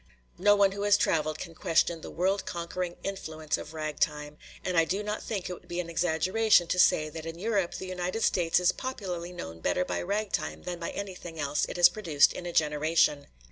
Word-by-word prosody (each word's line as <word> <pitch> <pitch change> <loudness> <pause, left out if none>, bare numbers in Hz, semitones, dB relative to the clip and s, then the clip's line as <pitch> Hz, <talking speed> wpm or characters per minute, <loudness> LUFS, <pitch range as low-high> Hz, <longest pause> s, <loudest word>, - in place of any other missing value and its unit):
No 205 +2 +5
one 200 -1 +4
who 200 +1 -5
has 205 0 +5
traveled 155 -4 +1
can 170 0 -7
question 165 0 +1
the - - -8
world 190 +3 0
conquering 175 +1 -4
influence 160 -6 -3
of 160 - -8
ragtime, 150 -1 -2 0.3
and 185 - -1
I 165 - +5
do 190 +6 -2
not 210 +1 -3
think 200 -5 -4
it 180 - -4
would - - -13
be 175 - -4
an 170 -1 -4
exaggeration 180 +5 +3
to 180 - 0
say 155 -3 +5
that 160 +1 -7
in 165 0 -6
Europe 200 -2 0
the - - -5
United 185 +4 -2
States 170 -1 +3
is 180 - +4
popularly 185 -9 -5
known 80 - -8
better 180 - 0
by - - -2
ragtime 205 +3 -2
than 175 -1 -5
by 170 - -3
anything 180 -5 -7
else 145 0 0
it - - -5
has 175 -1 +9
produced 170 -6 +3
in 175 - -6
a - - -3
generation. 150 -1 +2
175 Hz, 210 wpm, -29 LUFS, 160-195 Hz, 0.3 s, has